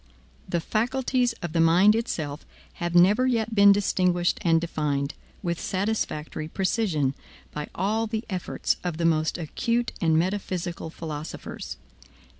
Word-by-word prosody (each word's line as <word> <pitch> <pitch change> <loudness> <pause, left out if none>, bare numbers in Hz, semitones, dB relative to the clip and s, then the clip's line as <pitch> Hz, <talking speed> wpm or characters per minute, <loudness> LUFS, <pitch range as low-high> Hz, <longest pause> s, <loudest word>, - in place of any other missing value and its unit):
The 170 - +1
faculties 245 +5 0
of 170 -2 -4
the 170 - +1
mind 175 +6 +6
itself 160 -10 -3 0.4
have 175 0 -1
never 205 +9 +5
yet 230 -3 0
been 200 -1 +7
distinguished 180 -3 +2
and 165 -1 +4
defined, 150 -4 -1 0.3
with 170 -2 -2
satisfactory 185 -6 -2
precision, 175 - 0 0.4
by 150 0 -5
all 215 +4 0
the 220 0 -3
efforts 185 -4 -1
of 175 -3 -2
the 170 - 0
most 155 -1 +2
acute 235 +8 -1
and 160 -2 +3
metaphysical 180 -2 -2
philosophers. 160 -1 -6
175 Hz, 130 wpm, -26 LUFS, 160-215 Hz, 0.4 s, been